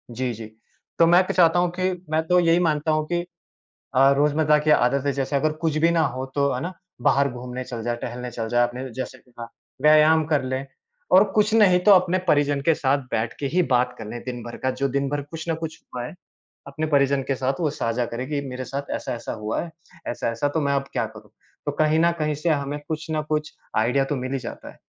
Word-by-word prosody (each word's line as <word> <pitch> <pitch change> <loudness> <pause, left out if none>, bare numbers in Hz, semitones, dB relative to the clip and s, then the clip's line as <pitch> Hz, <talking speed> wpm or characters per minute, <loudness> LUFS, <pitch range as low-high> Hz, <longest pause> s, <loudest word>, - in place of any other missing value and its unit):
जी, 125 0 -1
जी। 110 0 -8 0.5
तो 165 - +7
मैं 175 +2 +6
तो - - -1
चाहता 175 -1 +4
हूँ 175 -1 +2
कि 185 0 +1 0.2
मैं 160 +1 +1
तो 180 0 +4
यही 170 0 +4
मानता 150 +1 0
हूँ 155 0 +1
कि 175 0 0 0.7
अ, 135 +1 +6
रोज़मर्रा 150 +1 +3
की 155 +1 0
आदत 140 -1 +3
है, 140 - +2
जैसे 140 +1 -1
अगर 155 +2 +1
कुछ 160 -2 0
भी 170 - +5
ना 170 - +2
हो 130 +1 -4
तो, 140 -1 +2
है 125 - -3
ना, 180 - -4 0.3
बाहर 140 +2 +3
घूमने 125 +1 -6
चल 120 -2 -6
जा, 120 +1 -1
टहलने 125 +1 -6
चल 115 -1 -4
जा, 120 +1 +3
अपने 125 +2 -5
जैसे 130 0 -5
कि 125 - -27
हाँ, 115 0 -6 0.3
व्यायाम 155 +1 +6
कर 145 - +3
लें, 130 +1 -3 0.4
और 190 +3 +7
कुछ 215 +1 +3
नहीं 195 -5 +6
तो 210 - +6
अपने 185 0 +4
परिजन 145 -2 +3
के 165 - +5
साथ 140 0 +1
बैठ 110 +2 -1
के 140 - -1
ही 180 - +4
बात 125 0 +2
कर 110 - -7
लें 120 +1 -6
दिन 120 -2 -5
भर 120 0 -8
का। 130 - +3
जो 140 - +2
दिन 140 +1 -1
भर 145 0 -2
कुछ 160 +3 -8
ना 165 - +1
कुछ 160 0 -6
हुआ 120 -1 -3
है, - - -7 0.5
अपने 155 +3 -3
परिजन 140 -2 +2
के 135 - +2
साथ 135 +4 -2
वो 155 - +2
साझा 120 -4 -1
करें 125 +3 -5
कि, 145 -1 -1
मेरे 130 0 -5
साथ 140 +3 -5
ऐसा-ऐसा 120 -1 -5
हुआ 105 +1 -1
है, 170 - -7 0.4
ऐसा-ऐसा, 115 +3 -1
तो 160 +2 -1
मैं 140 -1 +1
अब 135 0 0
क्या - - 0
करूँ? - - -14 0.3
तो 145 - 0
कहीं 155 +1 +3
ना 170 +1 +4
कहीं 150 -1 0
से 165 +4 -1
हमें 145 -1 -1
कुछ 155 0 -4
ना 155 -1 0
कुछ 150 0 -2 0.2
आइडिया 125 +5 +2
तो 145 - +1
मिल 130 +1 -4
ही 135 - -1
जाता - - -8
है, - - -20
140 Hz, 245 wpm, -23 LUFS, 125-155 Hz, 0.7 s, तो